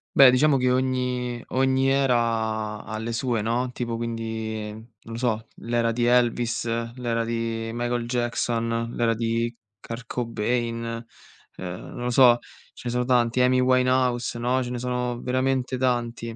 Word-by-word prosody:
Beh 135 -2 +9
diciamo 140 +3 +4
che 125 -1 +2
ogni 125 -1 -1
ogni 130 0 +2
era 115 -5 +1
ha 110 - -5
le 110 +2 -4
sue, 115 -2 -1
no, 120 +3 0
tipo 120 -2 -3
quindi 110 -1 -3
non 110 +2 -11 0.3
lo - - -4
so, 115 -2 -1
l'era 115 0 0
di 120 +1 0
Elvis, 120 -1 +2 0.3
l'era 120 -2 -1
di 115 -1 -2
Michael 120 0 -2
Jackson, 115 -1 -1
l'era 115 -1 +2
di 115 +1 -1 0.2
Kurt 115 +3 -7
Cobain, 115 0 -2 0.5
ehm, 90 0 -5
non 120 - -5
lo 125 - 0
so, 120 -1 +6 0.3
ce - - -13
ne - - 0
sono 125 0 0
tanti, 120 -1 +2
Amy 125 0 +4
Winehouse, 125 -2 +2
no, 125 +2 +1
ce 120 - -5
ne 125 - -3
sono 125 -1 -2
veramente 130 0 0
tanti. 120 -2 -1
120 Hz, 155 wpm, -25 LUFS, 115-125 Hz, 0.5 s, Beh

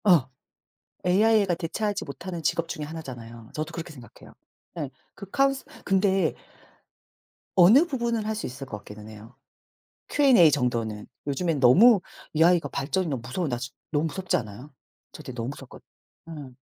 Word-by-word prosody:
아. 175 - +5 0.8
AI가 200 +1 +4
대체하지 200 +5 -2
못하는 175 +3 -7
직업 165 +2 0
중에 155 -3 -5
하나잖아요. 120 -7 -9
저도 155 +1 -4
그렇게 170 0 -6
생각해요. 125 -4 -14 0.4
예. 150 -5 -3 0.3
그 200 -1 -10
카운스 275 +3 +1 0.2
근데 195 -1 +2 1.2
어느 210 - +7
부분을 235 -7 -2
할 220 - -1
수 215 - -4
있을 130 +2 -6
것 105 - -6
같기는 105 +1 -11
해요 110 +3 -13 0.7
Q&A 260 - +6
정도는. 115 -6 -1 0.2
요즘엔 150 +2 0
너무 195 - +7 0.4
AI가 165 -1 +4
발전이 140 +8 -1
너무 135 -6 -3
무서워 160 +6 -2
나 120 - -1 0.3
너무 150 +1 +1
무섭지 185 +3 -1
않아요? 120 +6 -7 0.4
저 - - -10
되 - - -8
너무 120 -1 -4
무섭거 135 -2 -11 0.5
어.. 150 -5 -9
160 Hz, 320 characters per minute, -26 LUFS, 130-190 Hz, 1.2 s, 어느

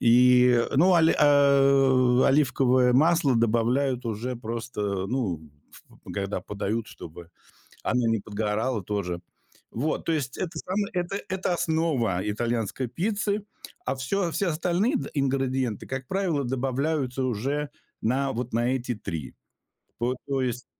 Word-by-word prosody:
И, 125 0 +5
ну, 180 +5 +5
оли 165 -1 +4
э, 135 -3 +4
оливковое 130 -2 +3
масло 155 0 +4
добавляют 120 +3 +1
уже 115 +3 -3
просто, 115 -1 -5 0.2
э, - - -3
ну, 100 - -2 0.7
когда 100 -2 -2
подают, 105 +3 -3
чтобы 85 +1 -11 0.5
она 125 -2 +1
не 115 -1 +2
подгорала 105 +2 -2
тоже. 90 -3 -3 0.5
Вот, 150 +7 -2
то 165 - +1
есть 140 -4 -2
это 175 -2 -4
сама 200 +4 -2
это 180 +2 -2
это 190 -1 -1
основа 155 - 0
итальянской 115 +3 -2
пиццы, 205 - -1 0.4
а 130 - 0
всё, 170 +7 -1
все 195 - 0
остальные 175 - 0 0.2
ингредиенты, 130 -4 -1
как 130 -1 -5
правило, 175 -8 0
добавляются 135 +1 -1
уже 135 +5 -2 0.3
на 135 +4 +1
вот 125 +1 -4
на 120 +2 +1
эти 125 -1 -2
3. 80 -10 -6 0.7
То 125 +2 0
то 135 -1 0
есть 125 -1 -2
130 Hz, 130 wpm, -26 LUFS, 115-150 Hz, 0.7 s, И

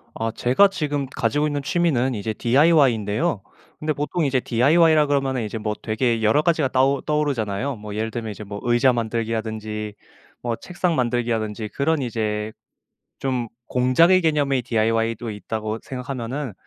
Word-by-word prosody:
아 115 0 -2
제가 130 - +4
지금 145 -7 -2
가지고 145 +2 0
있는 145 -1 -2
취미는 140 -6 +1
이제 110 0 -3
DIY인데요. 130 - +2 0.4
근데 155 0 -1
보통 150 +3 -1
이제 135 -2 +2
DIY라 150 +6 +4
그러면은 135 -3 0
이제 110 +1 -4
뭐 105 -1 -2
되게 115 +1 0
여러 110 +8 +3
가지가 160 -4 +2
따오 130 +1 +2
떠오르잖아요. 135 -5 -1
뭐 105 -1 -8
예를 110 +1 -2
들면 115 -1 -4
이제 105 - -8
뭐 100 0 -7
의자 120 +2 +3
만들기라든지 110 -2 -3 0.5
뭐 120 -1 -1
책상 180 -1 -2
만들기라든지 115 -4 -1
그런 155 +2 +1
이제 110 -3 -2 0.7
좀 125 -3 -2 0.2
공작의 145 +9 +4
개념의 145 -5 +1
DIY도 115 0 0
있다고 110 +1 -4
생각하면은 130 0 -5
125 Hz, 365 characters per minute, -22 LUFS, 110-145 Hz, 0.7 s, 제가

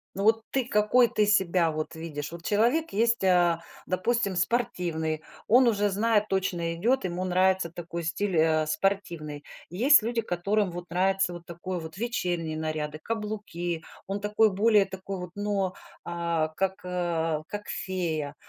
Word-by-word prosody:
Ну, 195 - -2
вот 225 +1 +4
ты 265 -3 0
какой, 210 +4 +4
ты 215 -3 +2
себя 185 -5 +3
вот 155 +1 -4
видишь? 155 -2 -5
Вот 170 0 -9
человек 240 - +2
есть, 230 0 +2
а, 175 -2 +3 0.2
допустим, 200 +1 0
спортивный. 175 -7 -1 0.3
Он 245 +2 +6
уже 205 -2 +2
знает, 210 +1 +2
точно 175 -3 -1
идёт, 235 +9 +1
ему 180 0 -2
нравится 185 -1 +2
такой 170 0 -6
стиль, 175 +2 -1
а, 155 -1 +3
спортивный. 155 -4 -2 0.3
Есть 245 - +6
люди, 230 +1 -1
которым 200 0 0
вот 175 0 -8
нравится 190 +1 +1
вот 175 0 -9
такой 175 +1 -5
вот 160 +1 -9
вечерние 175 -8 -2
наряды, 155 -1 -3
каблуки, 205 -6 -4 0.2
он 195 +1 -2
такой 210 +1 +3
более 210 +1 +4
такой 190 0 -6
вот, 180 -1 -7
но, 205 -2 -1 0.3
а, 170 -2 -1
как, 190 +4 -1
а, 165 -3 -1
как 205 0 -6
фея. 165 -6 -3
185 Hz, 155 wpm, -27 LUFS, 170-210 Hz, 0.3 s, Он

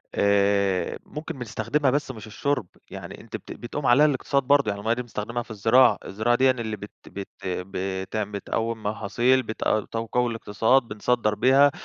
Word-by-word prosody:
آآ 100 -2 +2
ممكن 150 -2 -7
بنستخدمها 125 +4 0
بس 145 -1 -1
مش 110 -3 -10
الشرب، 125 -2 -1 0.2
يعني - - -8
أنتِ - - -9
بت - - -8
بتقوم 135 +4 -5
عليها 135 +5 +6
الاقتصاد 140 -1 +1
برضه، 140 -3 +3
يعني 100 - -3
المَيَّة 115 +2 +1
دي 125 - -3
بنستخدمها 115 0 -4
في 115 - -13
الزراعة، 115 +5 +5
الزراعة 110 +5 +1
ديًا 130 0 +5
اللي 110 -4 -4
بت 105 +1 -9 0.2
بت 100 -1 -7 0.2
بتعم 95 +3 -3
بتقوّم 110 +2 -3
محاصيل، 120 +5 +1
بتق 110 -1 -1
تقوّي 115 +2 -1
الاقتصاد، 115 +3 +2
بنصدّر 105 0 0
بيها، 135 +6 +5
115 Hz, 160 wpm, -25 LUFS, 105-130 Hz, 0.2 s, عليها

